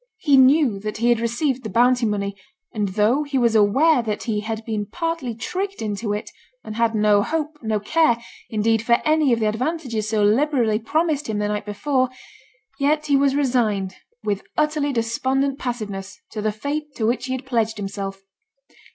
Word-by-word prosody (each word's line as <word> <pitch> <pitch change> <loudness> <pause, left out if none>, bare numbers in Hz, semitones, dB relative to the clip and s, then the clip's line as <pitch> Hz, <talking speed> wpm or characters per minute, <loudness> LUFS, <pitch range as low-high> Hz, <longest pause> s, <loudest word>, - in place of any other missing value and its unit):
He 290 -4 +3
knew 265 -4 +5
that 215 +1 -5
he 235 +2 +2
had 240 -1 +3
received 245 +3 -1
the 220 - -6
bounty 245 +3 +3
money; 200 -1 -2 0.4
and 210 -2 -1
though 210 +8 +2
he 285 -2 -2
was 235 -3 +3
aware 250 +8 +4
that 215 -2 -3
he 220 -3 -1
had 220 +1 -5
been 215 -2 -3
partly 330 - -3
tricked 385 - -4
into 210 0 -3
it, 210 0 -4 0.3
and 215 - -7
had 230 0 +1
no 210 -1 +4
hope, 305 +4 -3
no 220 -2 0
care, 240 +3 +2 0.3
indeed, 220 0 +1
for 235 +1 +2
any 310 -3 +3
of 235 - +2
the 220 - +1
advantages 235 -1 -2
so 215 -1 +1
liberally 230 -1 +2
promised 300 +3 0
him 215 - -1
the 210 0 0
night 210 0 -3
before, 255 +5 0 0.7
yet 300 +2 +1
he 285 -2 +2
was 275 0 +3
resigned, 220 -9 0 0.3
with 205 -2 -1
utterly 300 -1 +1
despondent 265 +3 0
passiveness, 210 -6 -5
to 215 - -4
the 215 0 0
fate 285 +7 -4
to 220 - -1
which 245 +3 0
he 260 - -2
had 260 0 -5
pledged 225 -4 0
himself. 195 -1 -5
235 Hz, 185 wpm, -22 LUFS, 215-280 Hz, 0.7 s, knew